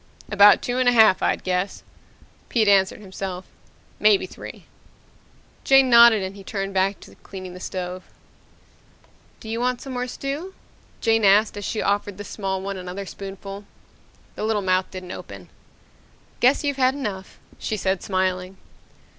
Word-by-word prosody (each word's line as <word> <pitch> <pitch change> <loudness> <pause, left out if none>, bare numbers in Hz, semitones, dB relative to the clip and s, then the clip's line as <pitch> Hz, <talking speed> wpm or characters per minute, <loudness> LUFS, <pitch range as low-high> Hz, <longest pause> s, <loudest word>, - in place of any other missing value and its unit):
"About 205 0 +6
two 245 +1 -1
and 255 -1 +4
a - - +2
half, 220 -5 +5
I'd - - 0
guess," 180 +1 -2 0.7
Pete 225 -3 +2
answered 195 0 +3
himself. 190 -2 -6 0.5
"Maybe 210 -2 +4
three." - - -11 1.0
Jane 270 -1 +5
nodded 235 -3 +7
and 190 +1 -5
he 200 - -11
turned 195 0 -4
back 195 +1 +1
to - - -14
cleaning 185 -2 -9
the 180 - -10
stove. 180 0 -5 1.4
"Don't 220 - -8
you 230 - -2
want 250 0 0
some 270 - -8
more 250 0 -3
stew?" 285 +9 -5 0.5
Jane 225 -1 +2
asked 205 +2 +4
as 205 -1 -6
she 220 - -2
offered 205 -1 -1
the 205 - -6
small 190 -2 -4
one 195 0 -4
another 185 +2 -6
spoonful. 195 +1 -8 0.7
The - - -6
little 215 -2 0
mouth 185 0 +1
didn't 185 -1 -8
open. - - -10 0.9
"Guess 260 +5 +3
you've 285 -2 -1
had 260 0 +2
enough," 205 -9 -6 0.2
she 215 - -3
said, 190 -1 -1
smiling. 185 -1 -2
200 Hz, 155 wpm, -23 LUFS, 190-230 Hz, 1.4 s, nodded